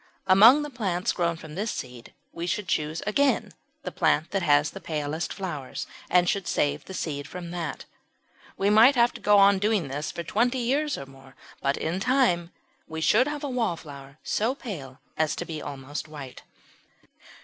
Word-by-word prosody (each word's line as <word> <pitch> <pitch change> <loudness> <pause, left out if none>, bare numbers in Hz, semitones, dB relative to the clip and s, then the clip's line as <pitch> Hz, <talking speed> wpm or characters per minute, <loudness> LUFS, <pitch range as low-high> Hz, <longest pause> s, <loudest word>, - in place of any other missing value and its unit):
Among 220 +10 +7
the 295 - -6
plants 190 -8 -1
grown 170 -2 0
from 160 -1 -11
this 205 +7 -2
seed 125 - -7 0.2
we 170 +1 -5
should 205 +1 -2
choose 155 +1 -1
again 270 +7 +1 0.3
the - - -4
plant 155 +3 +1
that 195 - 0
had 145 -3 +4
the - - -6
palest 155 +1 -3
flowers, 155 -9 -5 0.2
and 180 0 +4
should 195 -1 0
save 145 - 0
the 190 - -8
seed 145 -5 -4
from 175 0 -7
that. 170 -4 -5 0.7
We 200 +1 +2
might 230 +6 +7
have 240 0 +4
to - - -10
go 210 0 +5
on 200 -1 +6
doing 205 -7 +1
this 145 +3 -3
for 170 - -5
twenty 240 +9 +1
years 280 +5 0
or 140 - -7
more, 135 -1 -17 0.3
but 140 0 0
in 165 +4 -2
time 230 -8 +2 0.4
we 160 0 -6
should 215 - +4
have 295 0 -4
a 285 - -2
Wallflower 150 - -4
so 230 +5 0
pale 150 - -8 0.2
as 155 -1 +1
to - - -4
be 155 -2 -6
almost 145 +2 -6
white. 145 -4 -9
175 Hz, 180 wpm, -26 LUFS, 150-215 Hz, 0.7 s, Among